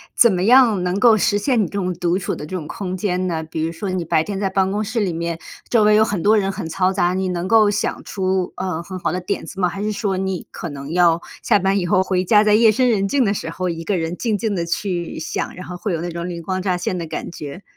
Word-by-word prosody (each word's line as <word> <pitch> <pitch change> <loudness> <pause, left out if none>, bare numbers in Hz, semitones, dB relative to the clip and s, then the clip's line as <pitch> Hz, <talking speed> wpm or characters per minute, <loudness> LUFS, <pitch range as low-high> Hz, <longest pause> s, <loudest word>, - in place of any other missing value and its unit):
怎 235 -3 +6
么 180 0 0
样 230 -5 +5
能 180 +2 -1
够 225 -1 +6
实 205 0 +2
现 240 +2 +1
你 - - 0
这 - - -8
种 185 -1 -1
独 175 +2 0
处 - - -3
的 150 - -7
这 185 - -6
种 160 -4 -5
空 185 +1 -4
间 185 -2 -1
呢？ 165 -3 -2
比 160 0 -4
如 165 - -1
说 190 +4 -5
你 185 -2 -2
白 160 0 +2
天 200 0 -4
在 195 -1 -1
办 190 0 +1
公 210 +1 -1
室 220 +3 -2
里 190 -5 0
面， 170 0 -3 0.3
周 225 -3 +3
围 210 0 +5
有 215 - +6
很 200 -5 -2
多 215 +1 +4
人 195 -1 +1
很 190 -3 -5
嘈 185 +3 +1
杂， 180 -1 +1
你 190 0 -1
能 180 0 -2
够 215 -1 +5
想 - - -2
出， 190 -2 -1
呃， 180 -3 -3
很 185 0 -7
好 - - -1
的 180 - -2
点 185 +3 -3
子 195 - -8
吗？ 180 - +3
还 195 +3 -5
是 215 - -1
说 205 -2 -1
你 190 -1 -3
可 170 - -6
能 140 +1 -7
要 170 -1 +4 0.2
下 210 - +3
班 195 +1 +1
以 175 - -2
后 185 0 +3
回 185 -1 0
家， 210 +2 +5
在 210 - +3
夜 220 0 +6
深 255 +3 +2
人 200 -4 +2
静 265 +3 +2
的 200 - +2
时 - - -4
候， 185 - -3
一 165 -1 -3
个 195 +1 0
人 165 +1 -2
静 215 +1 -1
静 220 0 -1
地 175 -3 -1
去 175 0 -3
想， 160 - -4
然 180 - -8
后 180 - -7
会 185 +3 -3
有 165 -2 -2
那 175 0 -4
种 170 +1 -4
灵 170 -1 -6
光 185 +1 -2
乍 185 -2 0
现 180 +1 -2
的 170 -2 -4
感 - - -5
觉？ 150 +4 -8
185 Hz, 315 characters per minute, -20 LUFS, 175-205 Hz, 0.3 s, 怎